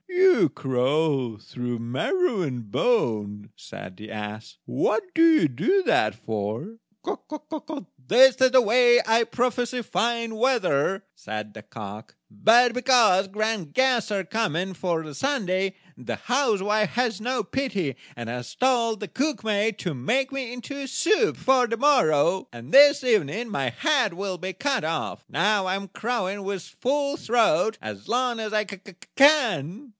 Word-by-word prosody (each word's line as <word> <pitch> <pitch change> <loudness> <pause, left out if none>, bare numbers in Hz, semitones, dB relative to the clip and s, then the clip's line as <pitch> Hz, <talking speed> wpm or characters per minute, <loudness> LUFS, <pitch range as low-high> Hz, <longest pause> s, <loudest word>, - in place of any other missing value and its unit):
"You 365 - +4
crow 135 -2 -1
through 120 +2 -5
marrow 190 - -1
and 125 - -5
bone," 105 - -1
said 90 0 -11
the 110 +1 -10
ass; 105 0 -7
"what - - 0
do 325 - +1
you 320 - +5
do 360 - +1
that 110 - +2
for?" 110 - -5 0.3
"That 305 - -7 0.2
is 260 +4 +7
the 260 0 +5
way 240 +2 +5
I 225 +1 +3
prophesy 245 +1 -2
fine 230 0 -1
weather," 215 - +1
said 105 0 -7
the 110 - -10
cock; 105 -2 -10 0.2
"but, 235 - +4
because 240 -7 +3
grand 210 -5 -3
guests 250 -4 +2
are 195 -2 -1
coming 190 -2 -2
for 170 -2 -2
the 155 -1 -9
Sunday, 195 - -1 0.2
the 125 - -5
housewife 215 -5 0
has 235 -4 -1
no 250 +1 -1
pity, 200 - -3 0.2
and 120 -1 -7
has 120 +1 -6
told 235 -4 +1
the 210 - -4
cook 285 +1 -2
maid 215 0 0
to 175 -4 -3
make 250 - -1
me 265 -3 -4
into 275 +3 -7
soup 420 - +1
for 255 -2 +3
the 230 0 -3
morrow; 190 - +2
and 120 +3 -11
this 285 0 +7
evening 220 - 0
my 135 -11 -1
head 255 - 0
will 190 -1 -4
be 185 +1 -5
cut 270 +8 -1
off. 160 0 -3
Now 205 -2 +1
I 185 - 0
am 195 0 -5
crowing 205 -2 -3
with 195 -2 -4
a - - -18
full 280 +2 0
throat 220 - +1
as 105 -2 -8
long 245 -1 0
as 215 -1 -4
I 215 -1 +1
can." 205 - +1
215 Hz, 150 wpm, -24 LUFS, 155-255 Hz, 0.3 s, is